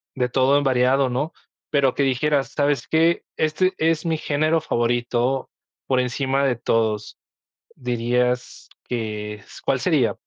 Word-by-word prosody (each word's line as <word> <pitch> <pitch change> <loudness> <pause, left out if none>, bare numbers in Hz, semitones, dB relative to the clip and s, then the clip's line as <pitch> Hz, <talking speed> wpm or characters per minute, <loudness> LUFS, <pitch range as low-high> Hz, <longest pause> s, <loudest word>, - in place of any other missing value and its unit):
de 125 -1 0
todo 135 +2 +3
en 145 - +1
variado, 130 0 +3
¿no? 145 +6 -2 0.4
Pero 140 -3 +3
que 140 - +1
dijeras: 135 +2 +1
"¿Sabes 145 -1 +1
qué?, 165 +2 +2
este 155 +4 +1
es 160 0 +1
mi 165 -1 0
género 155 +2 +1
favorito 120 +1 0 0.4
por 130 -1 +2
encima 135 +2 0
de 130 -3 +2
todos". 110 -2 -1 0.6
¿Dirías 125 0 -1 0.2
que 105 -3 -3
es? 105 - -14
¿Cuál - - +1
sería? - - +2
130 Hz, 140 wpm, -22 LUFS, 120-145 Hz, 0.6 s, todo